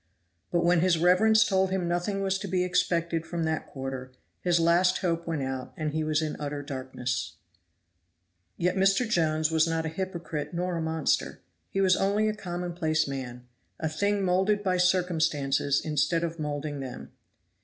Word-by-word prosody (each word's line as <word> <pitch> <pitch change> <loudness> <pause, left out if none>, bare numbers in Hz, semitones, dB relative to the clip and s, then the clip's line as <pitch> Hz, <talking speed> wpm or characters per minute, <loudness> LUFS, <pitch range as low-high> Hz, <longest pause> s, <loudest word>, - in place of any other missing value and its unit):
But 170 -1 +2
when 175 0 +4
his 175 0 +3
reverence 200 +6 +5
told 190 -1 +2
him 185 -2 -1
nothing 175 +3 -1
was 190 0 0
to 200 - -5
be 180 0 +1
expected 170 -2 0
from 170 0 -3
that 160 -1 -2
quarter, 130 -1 -6 0.3
his 175 -1 +2
last 170 +2 +4
hope 170 -1 -1
went 160 -4 -1
out 130 -1 -4
and 155 -1 -2
he 155 +1 -1
was 155 0 +1
in 155 - -3
utter 145 -1 -4
darkness. 130 - -4 1.2
Yet 180 +1 +1
Mr. 195 +5 +3
Jones 160 -6 +1
was 160 0 +3
not 165 0 -1
a - - -1
hypocrite 165 -3 -4
nor 180 +1 -1
a 165 - -2
monster; 160 -1 -1 0.3
he 195 - -1
was 190 -1 +5
only 205 +2 +1
a 215 - +1
commonplace 175 -5 -2
man 125 -3 -6 0.3
a 160 - -1
thing 200 +5 0
molded 190 +3 +2
by 185 -2 +1
circumstances 160 -7 +2
instead 155 +2 +1
of 165 0 -3
molding 145 -1 -3
them. 130 -2 -7
165 Hz, 170 wpm, -28 LUFS, 150-185 Hz, 1.2 s, reverence